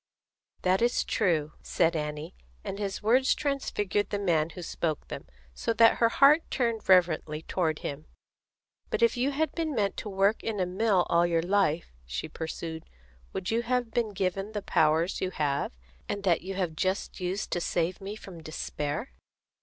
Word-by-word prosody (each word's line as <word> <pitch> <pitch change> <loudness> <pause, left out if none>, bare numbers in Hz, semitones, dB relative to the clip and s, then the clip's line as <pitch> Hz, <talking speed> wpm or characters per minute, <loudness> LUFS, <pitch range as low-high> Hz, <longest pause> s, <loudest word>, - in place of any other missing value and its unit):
"That 185 +2 +3
is 240 +1 +2
true," 155 -5 +1
said 165 -1 +1
Annie; 150 -1 -4 0.3
and 195 - -5
his 200 0 -3
words 255 +5 +4
transfigured 210 -8 -1
the 205 - -1
man 165 -6 +1
who 175 +2 -8
spoke 160 -2 -3
them, - - -7 0.3
so 230 - -1
that 230 0 +6
her 230 - +4
heart 285 +6 +6
turned 230 -5 -1
reverently 160 -4 +3
toward 160 -4 0
him. 150 +2 -6 0.8
"But - - 0
if 235 - +4
you 250 +3 +1
had 310 +3 0
been 320 -4 -2
meant 200 -3 0
to 210 - -4
work 195 +2 +2
in 220 -3 -2
a 185 - +2
mill 190 0 +2
all 170 +1 +3
your 165 -1 +1
life," 175 - +1
she - - -3
pursued, 160 +1 -6 0.5
"would 180 +1 -3
you 230 +1 +2
have 245 -1 -1
been 235 -2 0
given 195 +1 -2
the 210 -2 -3
powers 160 +4 +2
you 185 - 0
have, 145 -5 -1 0.4
and 200 - -3
that 180 -4 +3
you 190 +2 -5
have 180 -4 -1
just 190 +5 -1
used 185 +3 -2
to 175 - 0
save 175 +2 -1
me 200 +2 -5
from 185 -6 -10
despair?" 155 - -4
190 Hz, 175 wpm, -28 LUFS, 165-220 Hz, 0.8 s, that